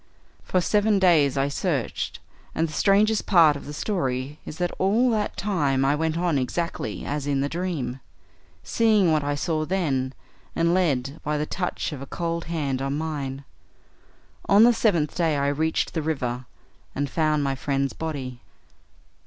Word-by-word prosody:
For 185 - 0
seven 210 +3 +2
days 160 -8 +4
I 135 +1 +2
searched, 145 - -2 0.4
and 165 - +1
the 155 - -9
strangest 210 +4 +3
part 165 -6 +6
of 140 - -8
the - - -6
story 145 - -2
is 155 - -7
that 175 0 -1
all 225 +6 +3
that 215 -2 -1
time 145 -10 +1
I 140 - +3
went 160 +2 -1
on 170 -5 +1
exactly 130 -4 -3
as 145 0 -3
in 140 -1 +1
the 140 - 0
dream, 150 -7 -3 0.6
seeing 215 -6 +3
what 155 -2 +2
I 145 0 -1
saw 155 +1 -1
then, 145 -7 -1 0.4
and 170 +1 +2
led 145 -6 0
by 150 0 -1
the 150 - -1
touch 180 +1 -3
of 140 - -7
a 140 - -7
cold 170 +1 -3
hand 145 -6 -2
on 135 +1 -1
mine. 140 -4 -4 1.1
On 200 +2 +7
the 240 +1 +7
seventh 170 -10 +1
day 160 -4 +1
I 140 0 +1
reached 160 +3 0
the 160 - -1
river, 125 -5 -3 0.5
and 145 +1 -1
found 155 0 +1
my 135 -1 0
friend's 135 0 -1
body." 135 -6 -5
155 Hz, 170 wpm, -25 LUFS, 140-175 Hz, 1.1 s, On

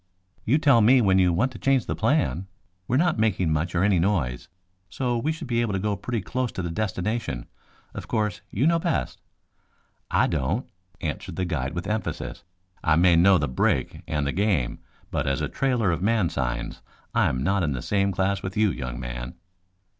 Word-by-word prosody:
"You 130 +7 +4
tell 140 -6 +5
me 125 +5 +6
when 95 -5 +4
you 90 -1 +4
want 120 +10 +1
to 115 - -10
change 135 -3 +2
the - - -2
plan. 115 - +1 0.4
We 125 - +1
are - - +4
not 170 -5 +2
making 95 -7 +2
much 85 +3 -1
or 85 - +2
any 100 -3 +3
noise, 80 -10 0 0.4
so 125 +3 -1
we 135 +7 0
should 160 -3 -6
be 120 -1 +1
able 115 -4 -1
to 95 - 0
go 105 +1 0
pretty 110 +3 -3
close 125 +5 -2
to 90 - -4
the 85 - -3
destination. 95 - -2 0.5
Of - - -7
course, 105 -4 -1
you 120 +8 0
know 165 +1 +4
best." 70 - -2 0.9
"I - - +3
don't," 80 - -1 0.4
answered 75 -2 -4
the 95 - -1
guide 75 -5 -2
with 85 +1 -3
emphasis. 105 +2 -3 0.4
"I 80 - +4
may 85 +1 +5
know 90 +3 +6
the 75 -2 0
brake 65 0 0
and 75 -2 -1
the 70 - 0
game, 95 - 0 0.3
but - - -1
as 70 0 +1
a - - -1
trailer 125 -8 +1
of 85 - -2
man 105 -3 +2
signs 60 -3 -3 0.3
I - - +3
am 65 +1 -2
not 100 +4 +1
in 75 -5 0
the 65 - -5
same 100 -1 +1
class 95 +1 0
with 95 +1 -5
you, 105 -2 +3
young 60 -3 -5
man." - - -6
95 Hz, 205 wpm, -25 LUFS, 80-115 Hz, 0.9 s, me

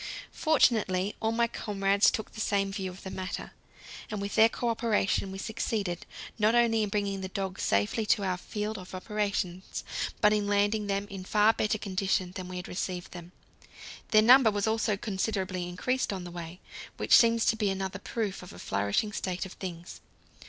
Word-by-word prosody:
Fortunately 210 - +2
all 220 - 0
my 235 +1 +2
comrades 200 -3 +2
took 220 - -4
the 220 - -6
same 195 -2 +1
view 190 -2 -3
of 185 +1 -11
the 190 - -6
matter, 185 -1 -5 0.6
and 210 - -3
with 200 0 -4
their 225 +1 +6
cooperation 225 -5 0
we 190 - -6
succeeded 210 -3 -3 0.3
not 215 +2 +4
only 230 -2 +4
in 210 - 0
bringing 200 -1 -1
the 190 - -3
dogs 190 0 -4
safely 100 - +1
to 205 - +3
our 185 -1 0
field 210 +3 -4
of 185 0 -9
operations, 190 -2 -3 0.4
but 210 - +5
in 210 -1 0
landing 205 +1 +1
them 200 0 -1
in 195 -1 -6
far 210 +3 +4
better 215 0 0
condition 195 -2 -1
than 185 -1 -6
when 185 0 -6
we 180 - -4
received 180 -1 -4
them. 175 0 -10 0.8
Their 215 -1 +6
number 250 0 +8
was 205 -1 -1
also 220 -2 +1
considerably 190 -3 -2
increased 250 +9 -1
on 190 -2 -4
the 175 - -8
way, 170 +1 -8 0.4
which - - +5
seems 230 -1 +5
to - - +3
be 210 -2 0
another 190 0 -3
proof 215 -4 -3
of 180 - -11
a - - -11
flourishing 100 - -1
state 185 -2 -3
of 190 - -9
things. 175 -2 -8
200 Hz, 185 wpm, -29 LUFS, 185-215 Hz, 0.8 s, number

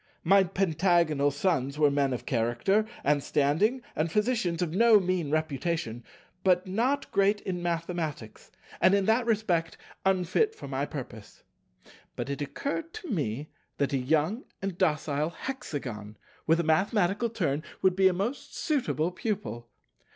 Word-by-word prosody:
My 195 +3 +6
Pentagonal 170 -5 +2
Sons 145 -2 0
were 150 -2 +4
men 140 -1 +1
of 125 - -4
character 125 - +1 0.2
and 145 0 +2
standing, 160 - +1
and 155 +1 0
physicians 210 -6 +1
of 160 -2 -3
no 225 +2 +6
mean 180 -5 -1
reputation, 155 -5 -2 0.4
but 185 0 +3
not 235 +9 0
great 200 +1 +3
in 180 -2 -4
mathematics, 165 -8 -4 0.3
and, 185 - +6
in 200 -1 +1
that 230 +3 +2
respect, 185 -7 0 0.3
unfit 190 - +2
for - - -9
my 140 +1 -2
purpose. 120 -7 -9 0.7
But 140 - -4
it 140 - -4
occurred 285 - -4
to 390 - -7
me 145 - -2 0.3
that 140 0 0
a - - +3
young 160 - 0
and 195 -2 -3
docile 155 -3 0
Hexagon, 130 - -6 0.3
with 165 +1 +4
a - - +2
mathematical 195 +6 +2
turn, 165 -10 -1 0.2
would 185 -1 +4
be 190 0 +5
a 190 - +3
most 210 +10 -4
suitable 250 - 0
pupil. 185 - -4
170 Hz, 145 wpm, -28 LUFS, 145-200 Hz, 0.7 s, My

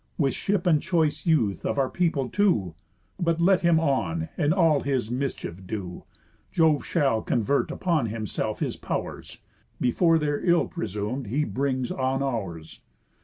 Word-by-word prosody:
With 140 -5 +1
ship 200 -3 -1
and 160 -4 +4
choice 165 -1 0
youth 120 - +2
of - - -1
our 135 -1 +2
people 160 -5 0
too! 125 - +1 0.5
But 170 -2 +1
let 185 +2 +4
him 170 -2 +4
on, 160 +2 0
and 155 -3 +1
all 165 -5 +4
his 130 -5 -1
mischief 120 -8 -4
do, 95 -5 -6 0.5
Jove 160 -3 +3
shall 135 -9 +1
convert 120 +6 0
upon 165 -9 0
himself 110 -1 -3
his - - -1
pow'rs, - - -5 0.4
Before 165 +7 +3
their 145 -2 -1
ill 175 -1 +3
presum'd 110 - -4
he 140 +9 0
brings 130 -3 -1
on 135 +1 0
ours. 95 -12 -4
140 Hz, 150 wpm, -26 LUFS, 120-165 Hz, 0.5 s, and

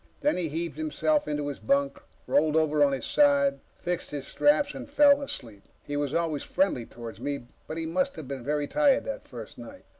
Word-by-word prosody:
Then 295 - +2
he 175 -3 -2
heaved 165 - -4
himself 310 -1 +1
into 150 -1 -2
his 145 - -5
bunk, 140 +5 +1 0.3
rolled 155 +1 +2
over 155 -2 +3
on 140 - +4
his 135 - -3
side, 280 -1 +3 0.2
fixed 175 0 -3
his 145 -2 -5
straps, 290 0 +2
and 270 +2 -8
fell 285 0 +6
asleep. 115 - -7 0.2
He 145 - -5
was 145 -2 -1
always 160 -3 0
friendly 185 -12 0
toward 115 -1 -9
me, 140 -4 -4 0.2
but 155 - -5
he 165 - -2
must 180 +3 0
have 155 -5 -8
been 135 -2 -5
very 150 +1 0
tired 285 - +3
that - - -5
first - - -9
night. - - -11
160 Hz, 205 wpm, -27 LUFS, -, 0.3 s, fell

